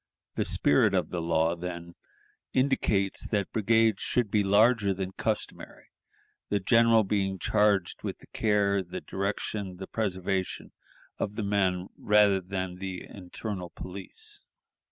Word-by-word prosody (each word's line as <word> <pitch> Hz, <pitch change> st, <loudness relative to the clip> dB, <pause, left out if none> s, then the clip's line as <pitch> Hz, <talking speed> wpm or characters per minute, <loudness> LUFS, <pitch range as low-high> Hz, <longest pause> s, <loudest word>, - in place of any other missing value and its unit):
The -, -, -1 dB
spirit 70 Hz, -, +3 dB
of -, -, 0 dB
the 90 Hz, -, -2 dB
law, 80 Hz, 0 st, +1 dB
then, 85 Hz, 0 st, -6 dB, 0.6 s
indicates 115 Hz, -7 st, +1 dB
that 100 Hz, -3 st, -1 dB
brigades 110 Hz, -1 st, +3 dB
should 120 Hz, -5 st, +1 dB
be 105 Hz, -1 st, +3 dB
larger 105 Hz, 0 st, +4 dB
than 95 Hz, 0 st, -4 dB
customary, -, -, -4 dB, 0.6 s
the 100 Hz, -, +1 dB
general 115 Hz, +3 st, +5 dB
being 95 Hz, -1 st, 0 dB
charged 105 Hz, -1 st, +1 dB
with -, -, -4 dB
the -, -, -17 dB
care, 100 Hz, -2 st, +1 dB
the 90 Hz, -1 st, -7 dB
direction, 100 Hz, -1 st, -3 dB
the 95 Hz, -, -6 dB
preservation 95 Hz, -3 st, -2 dB, 0.5 s
of 105 Hz, -, -2 dB
the 110 Hz, -, -2 dB
men, 95 Hz, -2 st, 0 dB
rather 105 Hz, -2 st, +4 dB
than 95 Hz, -1 st, -4 dB
the 95 Hz, -1 st, -5 dB
internal 95 Hz, 0 st, -6 dB
police." 410 Hz, -, -8 dB
100 Hz, 135 wpm, -28 LUFS, 95-105 Hz, 0.6 s, general